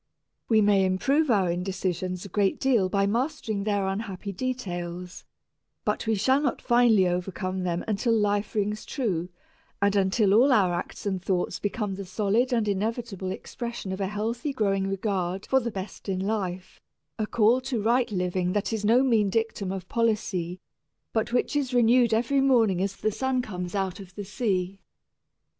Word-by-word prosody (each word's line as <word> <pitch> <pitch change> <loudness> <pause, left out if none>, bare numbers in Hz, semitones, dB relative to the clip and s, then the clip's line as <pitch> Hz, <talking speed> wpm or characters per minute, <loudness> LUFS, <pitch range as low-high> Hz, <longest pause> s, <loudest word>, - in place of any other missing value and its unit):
We 220 -2 +5
may 205 -2 +4
improve 270 +12 +2
our 195 -6 +3
indecisions 180 0 -3
a - - -8
great 195 +1 +1
deal 235 -9 +2
by 195 +1 +2
mastering 225 -2 -1
their 205 -2 +1
unhappy 195 0 -4
details, 180 -7 -5 0.6
but - - -1
we 220 - +2
shall 260 +7 +3
not 275 -5 0
finally 235 -6 +4
overcome 185 +1 -2
them 175 -1 -1
until 220 +3 0
life 205 -1 0
rings 210 0 -1
true 185 - -2 0.5
and 200 0 +2
until 195 +1 +3
all 250 +6 +5
our 195 -7 +4
acts 175 - -5
and 190 -2 -1
thoughts 180 -1 -1
become 205 -1 -2
the 195 +1 -6
solid 210 +6 +1
and 230 -3 +1
inevitable 205 -1 -2
expression 235 +1 -5
of 190 +1 -4
a 195 - 0
healthy 225 +7 -2
growing 195 -5 0
regard 195 -1 -2
for 265 - +3
the 235 -2 -3
best 195 -1 -7
in 185 -1 -1
life, 190 -3 -3 0.4
a 215 - 0
call 235 +4 +3
to 255 -2 -2
right 235 +4 +2
living 180 -1 -1
that 205 +2 -1
is 220 -2 -2
no 235 +5 +4
mean 225 -6 +3
dictum 220 -2 -1
of 190 -2 -5
policy, 195 -6 -1 0.5
but 220 0 0
which 250 +4 0
is 270 -3 0
renewed 240 0 +5
every 245 +5 +2
morning 225 -9 +3
as 195 +1 -1
the 215 - -1
sun 260 +3 -1
comes 180 -4 -5
out 190 -2 -2
of 190 -1 -12
the 205 - -6
sea. 195 -4 -1
205 Hz, 170 wpm, -26 LUFS, 190-230 Hz, 0.6 s, We